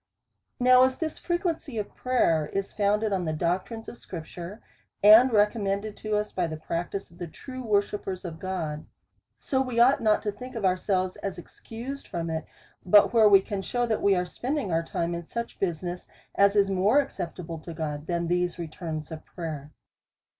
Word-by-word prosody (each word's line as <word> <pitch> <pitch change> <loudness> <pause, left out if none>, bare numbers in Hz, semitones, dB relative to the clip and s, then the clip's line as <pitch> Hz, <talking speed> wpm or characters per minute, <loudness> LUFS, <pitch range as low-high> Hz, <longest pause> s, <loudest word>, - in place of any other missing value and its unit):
Now 255 0 +6
as 260 0 +2
this 315 -2 -4
frequency 345 -7 -2
of 210 - -4
prayer 165 -12 +1
is 195 0 -2
founded 210 +1 +1
in 185 -2 0
the 160 - -1
doctrine 185 +8 -2
of 240 - -9
scripture, 175 +3 -8 0.4
and 220 +5 +9
recommended 210 -1 +1
to 215 -1 -2
us 210 0 -2
by 180 -2 -1
the 155 -1 -5
practice 170 +4 -4
of 170 - -18
the 175 - -4
true 255 - -9
worshippers 205 -4 -1
of 165 -2 -6
God; 165 -5 -4 0.5
so 265 -1 0
we 250 -3 -1
ought 250 +3 +5
not 215 -2 +3
to 210 - -1
think 250 +5 -10
ourselves 185 -2 0
excused 225 +8 -7
from 165 -1 -3
it, 160 -1 -3 0.4
but 205 +5 +6
where 220 -2 +7
we 195 -1 +7
can 200 0 -4
shew, 245 +5 -1
that 220 -2 -1
we 200 -1 +4
are 180 0 0
spending 255 - -3
our 165 0 +2
time 170 +1 -2
in 170 -1 -5
such 235 0 -5
busi 175 -3 -1
ness, 175 0 -5 0.3
as 200 +1 +4
is 200 -1 +3
more 200 +8 +4
acceptable 175 - -4
to 170 - -9
God, 155 -2 -4
than 170 -1 -1
these 175 0 0
returns 160 -2 -5
of 160 -1 -7
prayer. 155 -4 -7
195 Hz, 180 wpm, -27 LUFS, 170-225 Hz, 0.5 s, and